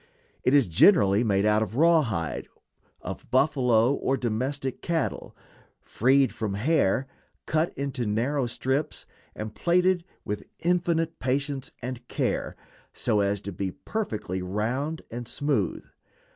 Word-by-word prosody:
It 130 - +4
is 140 -4 +6
generally 100 - +5
made 100 -3 +2
of 105 0 +2
rawhide 135 - +2 0.5
of - - -7
buffalo 130 -3 +3
or 135 -1 0
domestic 130 +3 -2
cattle, 165 -2 -2 0.4
freed 135 +3 +2
from 105 -3 -3
hair, 135 0 +2 0.4
cut 155 +2 +1
into 140 -4 -2
narrow 125 +6 0
strips, 135 +5 -2 0.3
and 110 0 -5
plaited 180 0 +2 0.2
with 105 0 -4
infinite 170 -2 0
patience 135 +1 -1
and 125 -1 -6
care, - - -2 0.4
so 105 - +1
as 100 0 0
to 100 - -6
be 95 +1 -3
perfectly 105 - -4
round 120 - -2
and 120 +1 -6
smooth. 135 - -1
130 Hz, 120 wpm, -26 LUFS, 105-145 Hz, 0.5 s, is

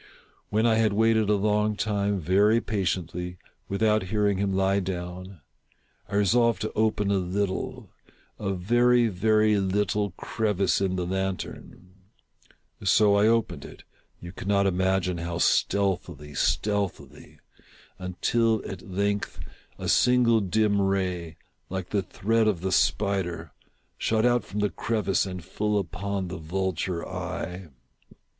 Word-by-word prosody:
When 110 +2 +1
I 115 -1 +4
had 110 -2 +2
waited 110 0 +3
a 105 - +4
long 105 +1 +1
time, 100 -2 0
very 100 +7 +3
patiently, 90 -4 -3 0.3
without 105 +2 +2
hearing 100 0 0
him 100 -1 0
lie 95 +1 +2
down, 90 -1 -6 0.7
I 100 - -4
resolved 115 +1 +3
to 110 - -3
open 105 -2 +1
a 100 - +2
little 95 +1 -3 0.2
— - - -33 0.2
a 100 -2 -2
very, 120 +5 +3
very 105 +2 +2
little 100 +1 0
crevice 100 -4 0
in 95 -1 0
the 90 -1 -2
lantern. 95 0 -5 0.9
So 100 +2 +4
I 100 +1 +4
opened 110 -10 +1
it - - -12 0.2
— - - -42
you 85 - -9
cannot 100 +1 0
imagine 95 -1 +1
how 85 0 -3
stealthily, 85 -7 0
stealthily 100 - -2 0.3
— - - -27
until, 110 +5 0
at 95 - -7
length, 100 0 -2 0.4
a - - -5
single 125 -2 +4
dim 105 +1 +1
ray, 90 -4 -1 0.3
like 95 -1 -5
the 100 - +1
thread 110 +4 0
of 95 -6 0
the 95 +1 -2
spider, 85 -3 0 0.5
shot 110 -1 +1 0.2
from 105 +1 -4
out - - 0
the 105 - +2
crevice 100 -1 0
and 90 -3 -7
full 105 +3 -1
upon 95 +1 -3
the 90 - -6
vulture 90 +1 -2
eye. 90 +1 -5
100 Hz, 135 wpm, -26 LUFS, 90-105 Hz, 0.9 s, I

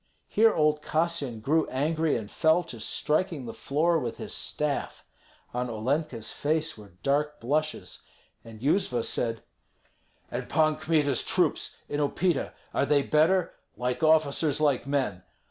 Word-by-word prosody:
Here 225 +1 +4
old 150 -4 +2
Kassyan 155 -8 -1
grew 155 +7 +2
angry, 155 +3 +1
and 110 -2 -7
fell 160 +2 +3
to 125 -8 -9
striking 155 - -1
the 115 - -6
floor 165 +4 +1
with 120 -5 -4
his - - -5
staff. 150 -2 -2 0.5
On 125 0 -2
Olenka's 120 +1 -1
face 155 +2 -1
were 105 -4 -14
dark 150 +2 0
blushes, 155 +6 -2 0.4
and 110 -1 -12
Yuzva 140 - +1
said, 115 -2 -1 0.9
"And - - -4
Pan 155 -1 +3
Kmita's 150 -5 +1
troops - - 0
in 145 - -3
Upita, 150 +2 0 0.2
are 140 - +1
they 145 -1 +3
better? 165 +5 +2 0.2
Like 125 +3 -2
officers, 155 -2 +3
like 140 -4 +1
men. 130 -10 -1
150 Hz, 140 wpm, -27 LUFS, 125-160 Hz, 0.9 s, Here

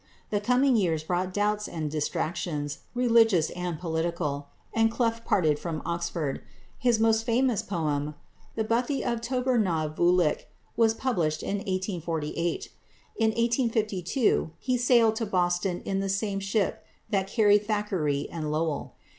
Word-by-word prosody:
The 205 -1 +1
coming 250 +4 +3
years 165 -7 +1
brought 180 +3 -1
doubts 210 +2 0
and 155 -3 -4
distractions, 150 -1 -2 0.2
religious 225 -9 +4
and 180 -2 -3
political, 160 -4 -2 0.3
and 225 0 +3
Clough 230 0 0
parted 155 -9 +2
from 165 -3 -3
Oxford. 170 -4 -2 0.4
His 240 -3 +2
most 225 0 +3
famous 240 -1 +2
poem, 150 -5 -2 0.4
"The 220 - 0
Bothie 240 +5 0
of 235 -1 -1
Tober 250 0 +1
na 165 -7 +1
Vuolich," 175 0 +2 0.3
was 225 -1 +3
published 170 -13 -1
in 205 - -1
1848. 175 -4 -2 0.5
In 225 - +3
1852 225 - +1
he 255 +6 -1
sailed 235 -3 +4
to 225 - -2
Boston 175 -1 0
in 195 -1 -1
the 195 0 -2
same 195 0 -1
ship 195 +1 -1 0.3
that 195 -2 +1
carried 205 -1 +3
Thackeray 185 -10 0
and 155 -3 -3
Lowell. 155 -1 -2
195 Hz, 140 wpm, -27 LUFS, 165-225 Hz, 0.5 s, religious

